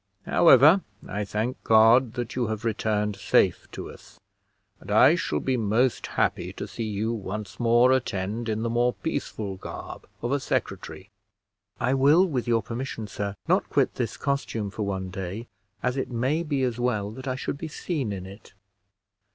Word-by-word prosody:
However, 165 +2 +6 0.3
I 105 +3 -3
thank 110 +5 -3
God 115 +2 +5
that 120 -1 -4
you 125 -2 0
have 110 +1 -4
returned 105 -2 0
safe - - +2
to - - -6
us; - - -16 0.6
and - - -13
I - - +6
shall 75 - -1
be 130 - 0
most 115 +3 +1
happy - - -1
to - - -6
see 115 - -5
you 105 +3 -1
once 105 -1 -6
more 120 +2 +5
attend 115 -3 -1
in 110 +1 -1
the 115 - 0
more 120 +1 +2
peaceful 110 -10 -4
garb - - -8 0.2
of 120 - -1
a 140 - +2
secretary." 105 -5 -4 0.7
"I 130 - +1
will, 145 +7 +5
with 135 -10 -2
your 115 -2 +2
permission, 115 0 -5
sir, 100 0 -4
not - - +2
quit - - +2
this 115 -2 -3
costume 125 -7 -2
for 110 - -6
one 95 -2 -3
day, 95 +4 -5 0.4
as 125 0 0
it 135 - -2
may 130 +7 0
be 145 -5 -1
as 125 -2 -1
well 110 -5 0
that 130 +4 -9
I 130 - -1
should 140 +2 -4
be 165 - -4
seen 150 - -3
in 95 -2 -5
it." 100 +3 -13
115 Hz, 175 wpm, -26 LUFS, 105-130 Hz, 0.7 s, However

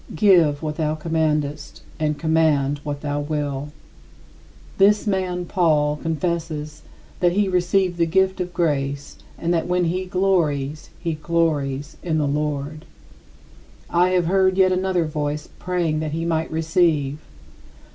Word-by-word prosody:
Give 165 -5 +4
what 150 -1 -3
thou 155 -1 0
commandest, 150 -2 -2 0.2
and 150 -1 0
command 150 -3 +2
what 145 -1 -5
thou 145 -1 -2
wilt. 145 -1 -3 1.1
This 205 +1 +5
man 185 -3 -1
[Paul] 155 -5 +2
confesses 160 -1 -3 0.4
that 175 -1 +3
he 205 +1 +2
received 180 0 +1
the 170 -1 +2
gift 190 +2 +2
of 180 0 -3
grace 140 -4 -2 0.2
and 170 +1 -1
that, 165 0 0
when 180 0 +1
he 180 +3 -1
glories, 160 -6 0
he 165 -2 -2
glories 150 -3 -1
in 160 -3 -1
the 150 -2 +1
Lord. 150 +1 -2 1.1
I 175 +1 +3
have 175 - +1
heard 190 +1 +2
yet 190 -1 +5
another 185 -2 +1
voice 150 0 -3
praying 175 -4 -1
that 155 -1 -3
he 165 +1 -2
might 160 -1 0
receive. 160 -3 +1
160 Hz, 135 wpm, -22 LUFS, 150-180 Hz, 1.1 s, This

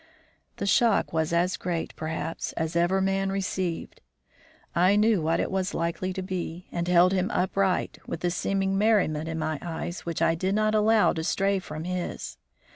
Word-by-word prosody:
The - - -3
shock 210 +1 +3
was 160 -1 0
as 175 +2 +1
great, 175 -2 -3
perhaps, 160 +1 -4
as 160 0 -3
ever 175 +3 +2
man 195 0 0
received. 185 -3 -3 0.7
I 180 +4 +4
knew 210 -3 +3
what 165 +2 +1
it - - -1
was 190 0 -1
likely 170 +3 -1
to 190 0 -4
be, 180 -2 -4
and 170 0 -2
held 180 +1 +5
him 185 0 +1
upright, 190 0 0
with - - -5
the 175 - 0
seeming 195 +2 0
merriment 180 -8 +2
in 160 - -3
my 155 -2 -2
eyes 170 +1 -4
which 170 -1 -3
I - - +4
did 185 +4 -1
not 215 0 +2
allow 215 0 +4
to 160 - -3
stray 195 +3 +1
from 155 -3 -7
his. 180 0 -4
180 Hz, 180 wpm, -27 LUFS, 165-195 Hz, 0.7 s, held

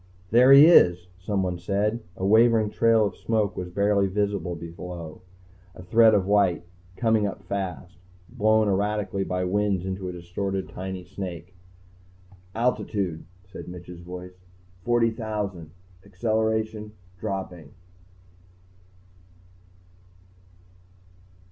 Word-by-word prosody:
"There 125 +4 +6
he 140 +2 +10
is," 90 - +5
someone 95 -2 -2
said. 105 +5 -1
A 95 - -4
wavering 110 0 +4
trail 115 -2 +3
of 100 - -3
smoke 110 -3 -1
was 90 -1 -5
barely 100 +1 +1
visible 100 -2 -2
below, 85 0 -8 0.5
a 90 - -11
thread 110 +4 +5
of 95 -2 +1
white, 100 -4 +2 0.3
coming 110 -2 +1
up 100 - -7
fast, 90 -3 -5 0.3
blown 110 -2 +2
erratically 100 0 -1
by 90 -1 -2
winds 100 -1 0
into 95 -1 -4
a - - -4
distorted 95 +2 -4
tiny 95 0 -6
snake. 90 -1 -8 1.0
"Altitude 105 -7 -1
..." 95 - -29
said - - -9
Mitch's 90 -1 -10
voice, 90 +1 -10 0.4
"40,000.... 110 -7 -1 0.3
Acceleration... 110 +1 -2 0.3
dropping." 95 -7 -5
100 Hz, 105 wpm, -25 LUFS, 90-110 Hz, 1.0 s, he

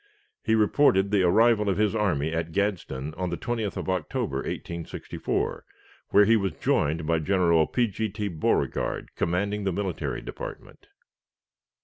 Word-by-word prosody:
He 110 - +2
reported 105 -3 +3
the 100 -2 +3
arrival 105 +3 +4
of 95 - 0
his 105 -1 +2
army 80 -8 0
at 80 0 -2
Gadsden 85 -8 -2
on 90 0 -2
the 85 - -3
20th 115 -4 -3
of - - -4
October, 95 -4 -2
1864, 85 -1 -4 0.5
where 105 0 +6
he 115 +2 +5
was 100 -6 0
joined 75 +2 0
by 80 0 +1
General 85 -2 +3
P. 125 - +1
G. 110 0 -3
T. 105 +1 -3
Beauregard, 80 -5 -1
commanding 100 +4 -1
the 95 - 0
military 85 -8 -3
department. - - -9
95 Hz, 145 wpm, -26 LUFS, 85-105 Hz, 0.5 s, where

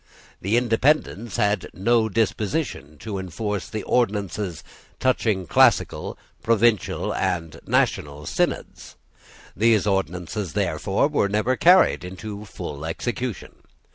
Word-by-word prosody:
The 105 +5 +1
Independents 120 -3 +1
had 105 0 +1
no 115 +3 +2
disposition 105 - -1
to 105 -3 -4
enforce 100 +2 -4
the 110 -2 -4
ordinances 100 -7 -1 0.4
touching 110 -7 +1
classical, - - +2 0.2
provincial, 115 -3 +2
and 85 -2 -2
national 75 0 0
synods. - - -2 0.6
Those 110 0 +3
ordinances, 95 0 -2
therefore, 95 - +1
were 145 -9 +1
never 105 +5 +1
carried 180 - +5
into 100 +3 -7
full 75 -7 -7
execution. 120 +7 -4
105 Hz, 105 wpm, -23 LUFS, 90-115 Hz, 0.6 s, carried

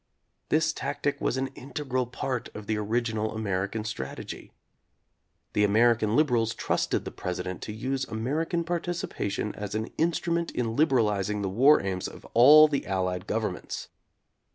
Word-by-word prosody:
This 160 0 +2
tactic 145 0 -2
was - - 0
an 135 0 -1
integral 130 -2 -3
part 125 0 -3
of 105 - -7
the 110 - 0
origi 110 +2 -1
nal 110 0 -1
American 100 0 -2
strategy. 110 - -6 1.0
The 105 - +3
American 110 +1 +3
liberals 120 -7 +2
trusted - - -1
the - - -5
President 90 0 -4
to - - -5
use 130 +5 -2
American 150 +10 -1
participa 175 - -2
tion 105 +1 -3
as 105 0 -5
an 110 +1 -3
instrument 170 +1 +1
in 115 -2 -1
liberalizing 105 -8 +2
the 95 - -1
war 130 +9 +5
aims 95 -2 -2
of - - -11
all 150 +6 +9
the 145 -2 -1
Allied 95 0 -1
governments. 110 -5 -3
115 Hz, 150 wpm, -27 LUFS, 105-145 Hz, 1.0 s, all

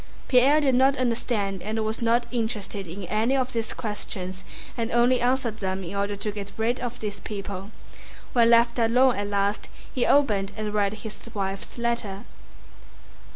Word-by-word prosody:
Pierre 275 +4 +5
did 270 -3 +3
not 265 +2 +4
understand 225 -6 -1
and 220 +1 -2
was 220 +2 -3
not 235 +1 +3
interested 215 -5 -3
in 190 +4 -7
any 220 +8 +1
of 260 -1 -1
these 225 -2 -2
questions 190 -4 -5 0.3
and 230 -1 -2
only 240 +2 +4
answered 245 -3 +1
them 190 -1 -2
in 180 +3 -6
order 200 +1 -1
to 210 +1 -3
get 200 -1 -6
rid 230 +3 0
of 245 0 -4
these 210 -1 -4
people. 200 -1 -6 0.6
When 235 -2 +5
left 235 +1 +5
alone 245 +3 +4
at 205 0 -2
last 200 0 0 0.3
he 250 - +1
opened 210 -9 +3
and 215 -1 -3
read 205 -1 +1
his 210 -1 -8 0.2
wife's 195 +2 -4
letter. 235 -4 -2
220 Hz, 165 wpm, -26 LUFS, 200-240 Hz, 0.6 s, Pierre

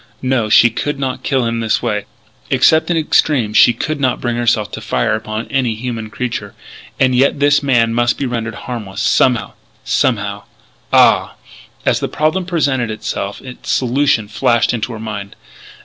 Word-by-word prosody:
No, 130 -4 0
she 120 +2 +6
could 145 +5 -3
not 135 -2 -3
kill 130 -3 0
him 115 0 -1
this 115 +1 0
way. 105 -4 -1 0.4
Except 160 +2 +3
in 170 - +1
extremes 140 -8 +1
she 120 - +7
could 155 +5 -3
not 130 -2 0
bring 120 -1 -2
herself 120 -3 0
to - - -7
fire - - 0
upon 110 +1 -4
any 130 -5 0
human 115 -1 -5
creature. 125 +2 -5 0.4
And 130 -1 +3
yet 135 +3 +2
this 145 0 +3
man 120 -5 +2
must 120 0 +1
be 140 - -2
rendered 115 -2 -3
harmless 110 -6 -6
somehow 125 -3 +2 0.3
somehow - - 0 0.5
ah! - - +4 0.5
As - - +2
the - - -2
problem 155 +4 -1
presented 140 -9 0
itself 100 -2 -4
its 125 -1 -10
solution 125 -3 +1
flashed 115 +3 +1
into 120 +1 -3
her 110 - -7
mind. 105 -2 -6
120 Hz, 165 wpm, -16 LUFS, 110-135 Hz, 0.5 s, she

